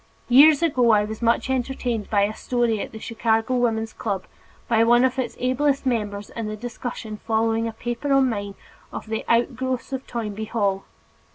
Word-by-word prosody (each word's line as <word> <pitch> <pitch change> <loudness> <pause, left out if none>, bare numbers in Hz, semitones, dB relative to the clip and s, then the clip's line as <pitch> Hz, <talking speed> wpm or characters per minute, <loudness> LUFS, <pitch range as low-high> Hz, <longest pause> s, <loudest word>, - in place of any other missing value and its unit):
Years 290 +5 +7
ago 255 -7 +3
I 210 -2 +5
was 220 +2 -7
much 235 +2 +2
entertained 250 -4 -2
by 205 -2 +2
a 205 +1 0
story 240 +1 -1
told 220 -2 0
at - - -21
the - - -9
Chicago 225 +1 0
Woman's 225 -3 0
Club 200 -4 -3 0.4
by 225 -1 +3
one 240 +2 +5
of 260 0 -1
its 260 - -3
ablest 275 +3 +1
members 210 -5 -2
in 230 -2 -5
the 215 0 -5
discussion 230 -1 -6
following 225 +1 0
a - - -3
paper 240 +5 -4
of 275 0 +5
mine 200 -5 -2 0.4
on - - -6
"The 220 0 -3
Outgrowths 255 +2 0
of 265 0 -4
Toynbee 220 -2 -4
Hall." 200 -4 -1
230 Hz, 185 wpm, -23 LUFS, 220-250 Hz, 0.4 s, Years